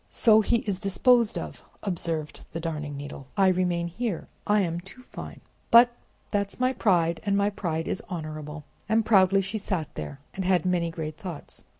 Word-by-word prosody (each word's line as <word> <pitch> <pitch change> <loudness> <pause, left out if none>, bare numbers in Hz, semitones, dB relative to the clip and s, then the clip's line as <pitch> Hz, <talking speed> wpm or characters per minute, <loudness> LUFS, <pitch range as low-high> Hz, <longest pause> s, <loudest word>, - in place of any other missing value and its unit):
"So 220 -2 +5
he 235 +2 +2
is 195 -3 -1
disposed 225 +3 +3
of," - - -6 0.2
observed 165 -5 -3
the 165 - -3
Darning 150 -3 -4
Needle. 140 -1 -8
"I 195 -1 +5
remain 175 -2 +1
here, 190 +1 -3 0.2
I 210 0 +4
am 170 -2 -1
too 195 +8 -13
fine. - - -9 0.3
But 240 +1 +8 0.4
that's 200 +1 -1
my 255 +1 +2
pride, 170 -8 +2
and 200 -2 +1
my 200 +1 +2
pride 165 -5 -3
is - - -2
honorable." 155 -2 -6 0.3
And 220 0 +3
proudly 195 -2 +5
she 205 +3 -3
sat 180 -7 -3
there, 140 - -6
and 190 - -3
had 180 -2 +2
many 175 -2 +1
great 160 -2 -5
thoughts. 175 -6 -8
185 Hz, 180 wpm, -27 LUFS, 165-205 Hz, 0.4 s, But